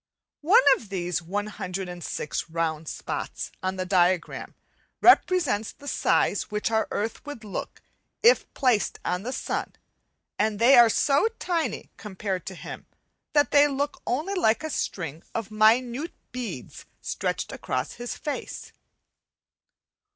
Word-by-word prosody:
One 405 +11 +6
of 215 - -12
these 180 -3 -2
106 180 -3 -4
round 160 -1 -2
spots - - -5
on 185 0 -1
the 185 0 -3
diagram 180 -2 +1 0.4
represents 285 - +4
the 285 - -14
size - - +1
which 210 +1 -1
our 220 0 +2
earth 220 +2 -3
would 290 -6 -8
look 205 -3 -6 0.4
if 475 +2 +5
placed 250 -6 +2
on 180 +1 0
the 240 +5 -4
sun; 265 - -3 0.7
and 215 0 +1
they 240 +5 +6
are 240 -2 +8
so 280 - +3
tiny 340 -3 -2
compared 190 -2 -4
to 190 - -5
him - - -9 0.5
that 290 -1 +3
they 290 0 +6
look 285 +1 -2
only 305 +11 -1
like 310 - +2
a 315 - -3
string 165 - -3
of 225 -2 -3
minute 235 +8 +3 0.2
beads 225 - -6
stretched - - -3
across 130 +2 -3
his 240 -1 -6
face. 295 - -5
215 Hz, 130 wpm, -26 LUFS, 185-275 Hz, 0.7 s, are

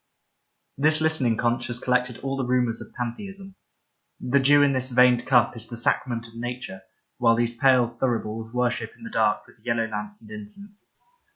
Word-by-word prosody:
This 155 +2 +4
listening 155 -8 +1
conch 120 0 0
has 120 -1 -3
collected 125 -1 0
all 135 0 -2
the 135 - -2
rumours 125 -2 0
of - - -11
pantheism; 195 - -6 0.7
the 140 +3 +2
dew 145 +2 +5
in 140 -1 +3
this 130 0 0
veined 125 -1 +4
cup 125 -2 +4
is 115 -1 -10
the 120 - -8
sacrament 115 0 -1
of 115 - -18
nature, 120 -4 -6 0.4
while 115 -2 +4
these 120 0 0
pale 125 -1 +4
thuribles 115 -2 -3
worship 120 -2 -1
in - - -16
the 230 - -8
dark 110 - +1
with 105 - -22
yellow 115 -2 0
lamps 105 -1 -6
and 110 -2 -15
incense. 195 - -10
120 Hz, 180 wpm, -25 LUFS, 115-130 Hz, 0.7 s, dew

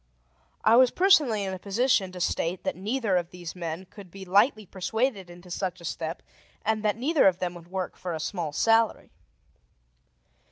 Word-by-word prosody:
I 225 +2 +6
was 255 0 +7
personally 295 - +4
in 190 -1 -3
a 185 - -6
position 205 0 +1
to 180 - -9
state 175 +1 -1
that - - -2
neither 210 0 0
of 175 -1 -2
these 175 -1 -8
men 170 +1 -5
could 195 0 -13
be 195 +2 -10
lightly 210 +4 +3
persuaded 200 +1 -2
into 175 +1 -13
such 185 0 -3
a 170 - -11
step, 160 +1 -4 0.4
and 220 0 0
that 210 0 0
neither 280 +1 +3
of 185 -2 +3
them 180 -1 -3
would 170 -1 -12
work 185 -1 -4
for 175 -2 -5
a - - -5
small 165 -1 -3
salary. 225 +5 +2
190 Hz, 185 wpm, -27 LUFS, 175-220 Hz, 0.4 s, was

